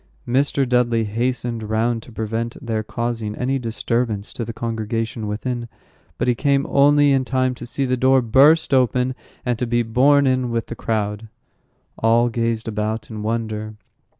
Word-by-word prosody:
Mr. 135 +1 +1
Dudley 120 -2 +2
hastened 120 +2 -2
round 110 +2 0
to 120 - -14
prevent 115 +1 -3
their 110 -2 -2
causing 115 -1 -3
any 135 +2 -1
disturbance 115 -2 -2
to 120 - -4
the 115 - -5
congregation 115 -1 -3
within; 120 +3 -3 0.5
but - - -1
he 125 - +4
came 140 +2 +1
only 145 +1 +4
in 135 -1 +3
time 130 0 0
to 120 -1 -8
see 135 +2 -1
the 130 0 +1
door 130 +1 +3
burst 140 +7 +4
open, 125 0 +2 0.3
and 120 -2 -1
to 125 - -1
be 120 0 +1
borne 140 +5 +4
in 130 -1 +1
with 115 -1 -1
the 120 - -7
crowd. 105 -1 -2 0.7
All 115 +2 +3
gazed 115 -1 -1
about 110 +1 -3
in 110 -1 -6
wonder. 110 -1 -3
120 Hz, 165 wpm, -21 LUFS, 110-130 Hz, 0.7 s, he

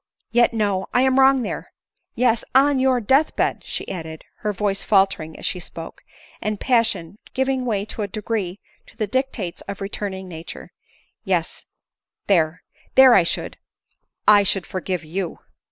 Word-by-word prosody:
Yet, 240 0 +4
no; 205 -4 0
I 250 - +5
am 265 0 +3
wrong 265 -1 +5
there - - -5 0.2
— - - -29
Yes; 235 -2 +2
on 275 0 +5
your 260 -1 +3
death 270 +7 +2
bed," - - 0
she - - -5
added, 160 -3 -6
her 210 - -2
voice 200 0 -1
faltering 195 -6 +1
as - - -6
she 180 - -1
spoke, 165 -1 -8 0.4
and 215 -1 -2
passion 220 -6 +1 0.2
giving 265 -1 0
way 210 -4 0
in 215 - -7
a - - -2
degree 205 -2 -3 0.3
to - - -19
the 220 - 0
.dictates 220 -5 -2
of 200 - -6
returning 195 -1 -5
nature 165 -2 -9 0.2
— - - -33
" - - -49
yes, - - -2 0.6
there; 165 -4 +2 0.3
there 265 -2 +9
I 195 - +7
should 170 - -2 0.4
— - - -51
I 210 -1 +8
should 195 -1 0
forgive 185 -2 -3
you." 170 +2 -4
205 Hz, 170 wpm, -22 LUFS, 185-245 Hz, 0.6 s, there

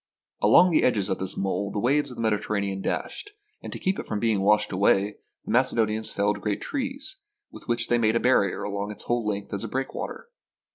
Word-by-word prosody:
Along 180 0 +6
the 160 - +4
edges 105 -6 +2
of 95 - -1
this 95 0 -4
mole 100 +1 -1
the - - -5
waves 140 +6 +2
of 125 - -9
the 115 - -3
Mediterranean 100 -2 -1
dashed, 415 - -4 0.3
and - - -7
to - - -5
keep 190 +1 -1
it - - -6
from 105 - -2
being 110 -3 +1
washed 105 +1 +3
away, 100 +1 +2 0.3
the - - -4
Macedonians 110 -3 +1
felled 100 0 0
great 105 -2 -1
trees, 275 +7 -4 0.3
with - - -13
which 120 0 0
they 120 - +2
made 110 0 +2
a - - +3
barrier 115 -7 +2
along 100 0 -3
its 105 - -8
whole 120 -1 0
length 100 -1 -3
as 100 - -3
a - - -3
breakwater. 135 - -4
110 Hz, 210 wpm, -26 LUFS, 100-125 Hz, 0.3 s, Along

